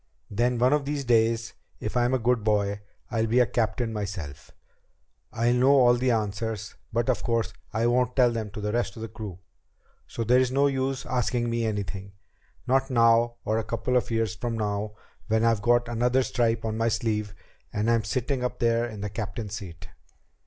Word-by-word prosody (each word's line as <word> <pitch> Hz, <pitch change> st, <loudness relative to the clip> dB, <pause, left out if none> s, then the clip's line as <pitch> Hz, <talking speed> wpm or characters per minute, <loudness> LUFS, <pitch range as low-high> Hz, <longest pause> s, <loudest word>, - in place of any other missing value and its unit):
Then 120 Hz, +4 st, +1 dB
one 125 Hz, +3 st, +3 dB
of 150 Hz, -2 st, +1 dB
these 145 Hz, -1 st, -2 dB
days, 115 Hz, -1 st, +2 dB, 0.3 s
if 110 Hz, -, -5 dB
I'm 125 Hz, +1 st, +2 dB
a -, -, +3 dB
good 120 Hz, -2 st, +1 dB
boy, 105 Hz, -1 st, +1 dB, 0.3 s
I'll 115 Hz, -1 st, +1 dB
be 120 Hz, +3 st, +3 dB
a 125 Hz, -, +6 dB
captain 120 Hz, 0 st, -1 dB
myself. 95 Hz, -9 st, -5 dB, 0.8 s
I'll 120 Hz, +2 st, +1 dB
know 125 Hz, +2 st, +4 dB
all 120 Hz, -1 st, +6 dB
the 125 Hz, +1 st, +1 dB
answers, 110 Hz, 0 st, -2 dB, 0.2 s
but 120 Hz, +2 st, 0 dB
of 130 Hz, -, +1 dB
course 115 Hz, -1 st, -1 dB, 0.2 s
I 115 Hz, +1 st, 0 dB
won't 125 Hz, +1 st, +2 dB
tell 125 Hz, -2 st, +5 dB
them 110 Hz, -2 st, -3 dB
to 105 Hz, -, -7 dB
the 105 Hz, 0 st, -1 dB
rest 115 Hz, -3 st, -1 dB
of 110 Hz, -, -7 dB
the -, -, -3 dB
crew. 105 Hz, -4 st, -8 dB, 0.7 s
So 115 Hz, -, -4 dB
there's 125 Hz, +2 st, +3 dB
no 140 Hz, +2 st, +3 dB
use 135 Hz, -1 st, -1 dB
asking 120 Hz, -1 st, 0 dB
me 115 Hz, -1 st, 0 dB
anything 100 Hz, -2 st, -4 dB, 0.5 s
not 135 Hz, +2 st, +2 dB
now 115 Hz, -1 st, +4 dB
or 110 Hz, +1 st, +1 dB
a -, -, -2 dB
couple 115 Hz, +3 st, -2 dB
of 125 Hz, -, +1 dB
years 115 Hz, -2 st, 0 dB
from 115 Hz, +2 st, -3 dB
now 105 Hz, 0 st, -2 dB, 0.3 s
when 110 Hz, +1 st, +2 dB
I've 115 Hz, -3 st, +2 dB
got 120 Hz, +2 st, +3 dB
another 120 Hz, +2 st, +2 dB
stripe 115 Hz, -2 st, 0 dB
on 110 Hz, 0 st, -2 dB
my 115 Hz, -, +2 dB
sleeve 105 Hz, -2 st, -1 dB, 0.4 s
and 105 Hz, -1 st, -1 dB
am 115 Hz, -1 st, +3 dB
sitting 130 Hz, +2 st, -1 dB
up 125 Hz, -, -2 dB
there 115 Hz, 0 st, +2 dB
in 110 Hz, -3 st, -8 dB
the 105 Hz, -, -3 dB
captain's 105 Hz, 0 st, -5 dB
seat." 95 Hz, -2 st, -8 dB
115 Hz, 195 wpm, -26 LUFS, 110-125 Hz, 0.8 s, a